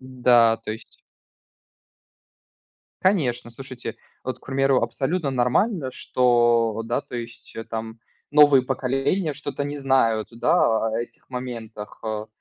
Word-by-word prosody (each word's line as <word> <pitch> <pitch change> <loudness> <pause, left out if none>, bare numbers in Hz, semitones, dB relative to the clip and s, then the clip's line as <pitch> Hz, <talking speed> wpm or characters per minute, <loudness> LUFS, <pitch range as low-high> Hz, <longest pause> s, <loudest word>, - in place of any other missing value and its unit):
Да, 125 -3 +4
то 115 - -5
есть 110 - -12 2.0
Конечно, 130 - +1
слушайте, 130 +1 -8 0.3
вот, 130 -1 -4
к - - -22
примеру, 135 -1 +2
абсолютно 140 +6 -1
нормально, 130 - +1
что, 120 -3 +2
да, 120 +4 -1
то 140 -3 -12
есть 120 0 -8 0.2
там 110 0 -5 0.3
новые 145 -3 +6
поколения 135 +6 -1
что-то 140 0 -4
не 145 +1 -4
знают, 130 -6 +2
да, 115 -1 +2
о 110 - -2
этих 120 - -8
моментах. 115 -4 -7
А, 110 -1 -3
125 Hz, 120 wpm, -23 LUFS, 115-135 Hz, 2.0 s, новые